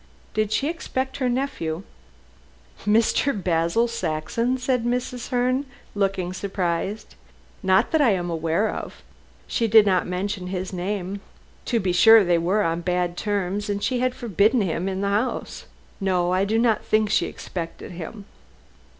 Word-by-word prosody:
"Did 215 -1 0
she 275 +6 +1
expect 265 -5 -3
her 255 -3 0
nephew?" 240 - -2 1.0
"Mr. 225 +6 +3
Basil 175 +5 +1
Saxon?" 230 +4 -1
said 250 -1 0
Mrs. 245 0 -2
Herne, 255 +2 +1 0.3
looking 195 -3 -1
surprised. 190 +1 -3 0.5
"Not 190 0 +3
that 320 - +3
I 270 - +5
am 175 -2 -2
aware 165 +5 0
of. - - -6 0.4
She 230 - 0
did 220 -1 +7
not 185 -2 +2
mention 185 +1 -3
his 185 0 -4
name. 190 +1 -3 0.4
To 235 - +1
be 190 -3 0
sure, 220 +5 +7
they 175 -2 +2
were 190 +5 +1
on 165 -1 -1
bad 180 0 -1
terms, 205 0 -2
and 200 0 -2
she 255 -2 0
had 255 0 0
forbidden 220 +2 +2
him 180 -1 -1
the 200 - 0
house. 210 +6 -2 0.3
No, 180 -3 +1
I 190 +1 +2
do 220 +3 +1
not 230 -2 +2
think 215 -1 +1
she - - +2
expected 170 -1 -7
him." 180 +4 -8
200 Hz, 150 wpm, -24 LUFS, 180-235 Hz, 1.0 s, did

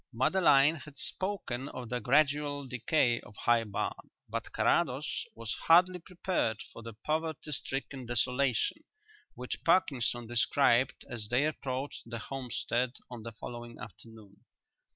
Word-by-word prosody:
Madeline 145 +3 +4
had 145 -1 -12
spoken 155 -11 -3
of 125 -3 -7
the 125 - -1
gradual 145 +3 +2
decay 125 0 +2
of 105 - -15
High 115 +1 +3
Barn, 105 - -4 0.2
but - - -4
Carrados - - +1
was 115 -2 -4
hardly 180 +2 +6
prepared 175 - -1
for - - -9
the 115 0 -8
poverty 155 -1 -1
stricken 135 -2 -3
desolation 125 - +1 0.5
which 125 0 -5
Parkinson 130 -9 +2
described 120 +2 +2
as 110 -3 -5
they 125 +4 +3
approached 140 -2 -3
the 115 0 -4
homestead 125 0 -2 0.2
on 120 -2 -7
the 115 +1 -6
following 120 +1 -8
afternoon. 110 -1 -12
130 Hz, 130 wpm, -31 LUFS, 120-150 Hz, 0.5 s, hardly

